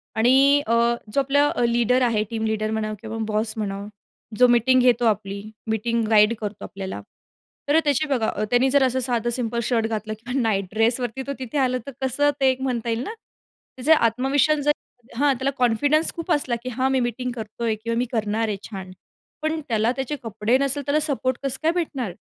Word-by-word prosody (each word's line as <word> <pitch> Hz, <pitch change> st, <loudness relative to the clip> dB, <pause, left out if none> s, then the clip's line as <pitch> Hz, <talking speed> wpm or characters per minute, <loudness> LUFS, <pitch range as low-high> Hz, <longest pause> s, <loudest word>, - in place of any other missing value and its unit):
आणि 270 Hz, +5 st, +5 dB
अ, 230 Hz, -, +1 dB, 0.4 s
जो -, -, +2 dB
आपला 285 Hz, +2 st, +2 dB, 0.2 s
लीडर 240 Hz, +2 st, +2 dB
आहे. 225 Hz, -4 st, +2 dB
टीम 225 Hz, -1 st, -2 dB
लीडर 215 Hz, 0 st, -1 dB
म्हणा 215 Hz, -1 st, -2 dB
किंवा 225 Hz, 0 st, -6 dB
बॉस 215 Hz, +1 st, -1 dB
म्हणावं. 200 Hz, -1 st, -4 dB, 0.5 s
जो 250 Hz, -, +6 dB
मीटिंग 245 Hz, +2 st, +4 dB
घेतो 245 Hz, -1 st, +3 dB
आपली. 200 Hz, -2 st, 0 dB, 0.3 s
मीटिंग 230 Hz, +1 st, 0 dB
गाईड 210 Hz, 0 st, +5 dB
करतो 210 Hz, -1 st, -5 dB
आपल्याला 190 Hz, -, -6 dB, 0.7 s
तर 295 Hz, -, +5 dB
त्याची 290 Hz, +1 st, +1 dB
बघा, 250 Hz, -6 st, 0 dB, 0.2 s
त्याने 245 Hz, +2 st, +4 dB
जर 280 Hz, 0 st, +4 dB
असं 260 Hz, 0 st, +1 dB
साधं 240 Hz, -2 st, -1 dB
सिंपल 235 Hz, -1 st, -2 dB
शर्ट 225 Hz, -1 st, +1 dB
घातलं 215 Hz, -1 st, -3 dB
किंवा 250 Hz, +4 st, -3 dB
नाईट 200 Hz, -4 st, +1 dB
ड्रेसवरती 235 Hz, +3 st, 0 dB
तो 280 Hz, -, -2 dB
तिथे 260 Hz, +2 st, -4 dB
आला. 255 Hz, -2 st, +2 dB
तर -, -, -5 dB
कसं 265 Hz, +3 st, +2 dB
ते 270 Hz, -1 st, +4 dB
एक 260 Hz, 0 st, -1 dB
म्हणता 245 Hz, -3 st, -2 dB
येईल 230 Hz, +2 st, -1 dB
ना. 435 Hz, -, -5 dB, 0.6 s
त्याचा 295 Hz, +5 st, +4 dB
आत्मविश्वास 270 Hz, +6 st, +2 dB
जर 295 Hz, -, +5 dB, 0.5 s
हां. 285 Hz, 0 st, +3 dB
त्याला 265 Hz, +2 st, -1 dB
कॉन्फिडन्स 285 Hz, +6 st, +2 dB
खूप 340 Hz, +1 st, -4 dB
असला 275 Hz, -6 st, +1 dB
की 255 Hz, -, -4 dB
हां 260 Hz, +2 st, 0 dB
मी 265 Hz, -, +2 dB
मीटिंग 245 Hz, +1 st, -2 dB
करतोय 225 Hz, 0 st, -3 dB
किंवा 230 Hz, 0 st, -1 dB
मी 245 Hz, -, +1 dB
करणार 220 Hz, -1 st, 0 dB
आहे 210 Hz, -2 st, -2 dB
छान. 190 Hz, -3 st, -7 dB, 0.5 s
पण 315 Hz, +1 st, -1 dB
त्याला 225 Hz, 0 st, +2 dB
त्याचे 270 Hz, +2 st, -3 dB
कपडे 225 Hz, +2 st, +1 dB
नसल 275 Hz, +1 st, 0 dB
तर -, -, -13 dB
त्याला 290 Hz, +1 st, +2 dB
सपोर्ट 260 Hz, -4 st, -1 dB
कसं 270 Hz, -1 st, -2 dB
काय 320 Hz, -, +4 dB
भेटणार? 280 Hz, -, -3 dB
245 Hz, 195 wpm, -23 LUFS, 220-270 Hz, 0.7 s, जो